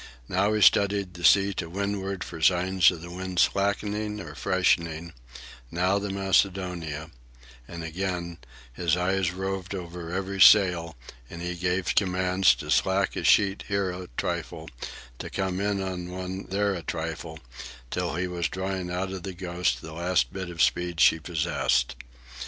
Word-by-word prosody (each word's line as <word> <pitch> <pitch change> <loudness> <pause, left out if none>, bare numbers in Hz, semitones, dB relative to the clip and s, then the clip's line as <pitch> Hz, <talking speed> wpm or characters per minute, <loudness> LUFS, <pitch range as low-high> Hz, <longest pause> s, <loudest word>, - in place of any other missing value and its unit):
Now 100 +3 +1
he 105 -1 +2
studied 100 -2 +4
the 85 0 -10
sea 100 +5 +5
to 85 -3 -4
windward 100 0 -3
for 80 -2 -8
signs 90 +2 +4
of 85 -3 -5
the 85 - -8
wind 95 0 -6
slackening 105 +2 +1
or - - -8
freshening, 85 -3 0 0.6
now 90 +5 +1
the 100 0 -4
Macedonia; 90 -5 0 0.6
and 85 -1 -7
again, 85 0 -4 0.3
his 85 +5 +1
eyes 95 0 +1
roved 95 +1 -4
over 85 -2 -7
every 95 +1 -3
sail, 90 -6 +6 0.3
and 85 0 -8
he 90 0 -2
gave 90 +1 -1
commands 90 -1 +3
to - - -6
slack 95 +1 +2
a - - -3
sheet 100 -1 +3
here 100 -2 0
a 90 0 -7
trifle, - - -3 0.5
to - - -6
come 95 -1 -2
in 100 -1 0
on 90 -2 -4
one 95 +1 -5
there 100 +1 +1
a 90 - -4
trifle, 80 +1 -5 0.5
till - - -2
he 90 +2 -1
was 85 -2 -2
drawing 95 -1 -3
out 90 +2 -2
of 95 - -5
the 95 +2 -6
Ghost 85 -7 -1
the 80 - -8
last 85 -7 0
bit 95 -2 -5
of 85 -2 +1
speed 90 -2 0
she 80 - +6
possessed. 75 -6 0
90 Hz, 160 wpm, -26 LUFS, 85-95 Hz, 0.6 s, sail